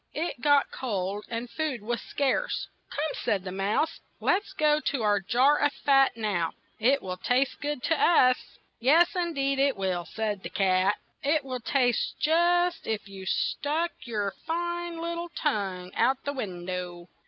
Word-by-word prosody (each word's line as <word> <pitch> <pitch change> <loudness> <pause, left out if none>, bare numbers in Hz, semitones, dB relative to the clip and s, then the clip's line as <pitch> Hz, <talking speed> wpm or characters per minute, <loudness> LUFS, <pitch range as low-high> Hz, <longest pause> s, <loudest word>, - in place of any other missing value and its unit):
It 305 -5 -3
got 285 -1 +4
cold, 205 -4 -3
and 235 +1 -3
food 275 -5 -3
was 235 +2 -2
scarce. 285 - -1 0.2
"Come," 305 +2 -2
said 195 -3 0
the 185 - -5
mouse, 200 - 0 0.2
"let 380 - +2
us 410 - -14
go 300 -4 +3
to 275 -5 -1
our 205 -1 +3
jar 255 +9 +3
of 290 - +2
fat 270 -4 +3
now; 195 -7 -1 0.3
it 265 +5 +3
will 185 -1 -4
taste 255 +7 0
good 290 -3 -3
to 325 -2 +1
us." 255 -7 +3 0.2
"Yes, 325 +10 +4
in 345 -2 -1
deed, 275 0 0
it 275 -4 +2
will," 185 -3 -1
said 215 -3 -3
the - - -6
cat. 190 +1 +2 0.3
"It 290 +1 +1
will 255 -1 -4
taste 245 0 +1
just 345 +3 +2
as 220 - +2
if 205 - -12
you 195 -1 -9
stuck 315 - 0
your 210 -4 -2 0.2
fine 345 +1 -2
lit 335 +1 -3
tle 345 0 -4
tongue 195 - -2
out 265 +1 +3
of - - -37
the 285 - -2
win 185 -10 -5
dow. 180 -1 -5
255 Hz, 180 wpm, -27 LUFS, 200-305 Hz, 0.3 s, got